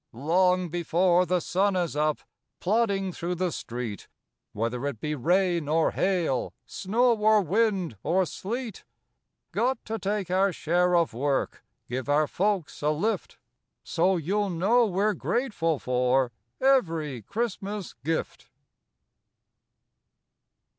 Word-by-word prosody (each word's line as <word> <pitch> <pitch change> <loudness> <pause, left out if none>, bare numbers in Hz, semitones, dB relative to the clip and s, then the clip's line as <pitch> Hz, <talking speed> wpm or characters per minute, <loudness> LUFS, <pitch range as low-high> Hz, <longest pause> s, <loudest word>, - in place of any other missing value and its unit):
Long 180 +7 +2
before 175 +2 +2
the 180 +1 +2
sun 190 +4 +1
is 175 -4 -1
up, 150 0 0 0.4
Plodding 200 -2 +1
through 175 +2 -3
the 180 0 -1
street, 120 -6 -5 0.4
Whether 120 +5 -2
it 135 -6 -4
be 150 +4 -2
rain 175 +3 +1
or 160 +2 +2
hail, 175 -9 0
Snow 235 +5 +1
or 215 -1 +4
wind 190 - 0
or 185 +4 +2
sleet. 225 +5 -5 0.7
Got 255 +1 0
to 225 +1 -3
take 200 -2 -2
our 190 +1 +3
share 175 +2 +1
of 170 -6 +2
work, 135 +3 -1 0.2
Give 130 +2 -4
our 150 +1 +4
folks 190 +2 -1
a 150 - +1
lift. 195 +9 -1 0.5
So 180 +2 +1
you'll 200 +5 0
know 210 +8 +3
we're 205 +2 +1
grateful 205 - -1
for 125 0 +1 0.3
Every 165 - +1
Christmas 205 - -4
gift. 160 +2 -3
180 Hz, 120 wpm, -27 LUFS, 150-200 Hz, 0.7 s, or